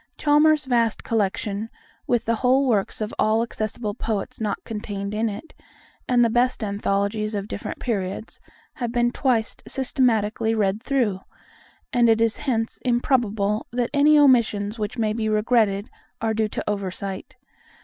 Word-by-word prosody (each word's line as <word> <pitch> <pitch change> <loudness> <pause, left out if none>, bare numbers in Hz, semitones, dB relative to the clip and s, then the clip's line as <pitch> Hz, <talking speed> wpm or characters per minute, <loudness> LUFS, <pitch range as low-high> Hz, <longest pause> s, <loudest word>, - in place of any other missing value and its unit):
Chalmers's 300 -1 +4
vast 235 -3 +1
collection, 210 0 -1 0.4
with 240 -2 +1
the 230 - +1
whole 260 +3 +3
works 215 -3 0
of 215 - -3
all 220 +1 +3
accessible 215 -2 -4
poets 215 0 -4
not 210 -2 -2
contained 205 -2 -5
in 220 +1 0
it, 210 +11 -8 0.5
and 245 -1 +4
the - - +2
best 245 0 +1
anthologies 205 +1 -1
of 200 0 -3
different 205 - -5
periods, 200 -2 -3 0.3
have 240 -2 -3
been 240 0 +2
twice 245 -4 0
systematically 225 -4 +1
read 205 0 0
through; 240 -8 0 0.7
and 240 -2 +4
it 225 0 +4
is 225 -1 +1
hence 225 -3 -2
improbable 225 -4 +1
that 240 0 -1
any 295 +1 +5
omissions 230 -6 +3
which 210 +3 -3
may 215 -2 +1
be 220 -1 -1
regretted 215 -2 +2 0.3
are 220 0 0
due 220 0 +1
to - - -5
oversight. 195 0 -4
225 Hz, 150 wpm, -23 LUFS, 210-245 Hz, 0.7 s, any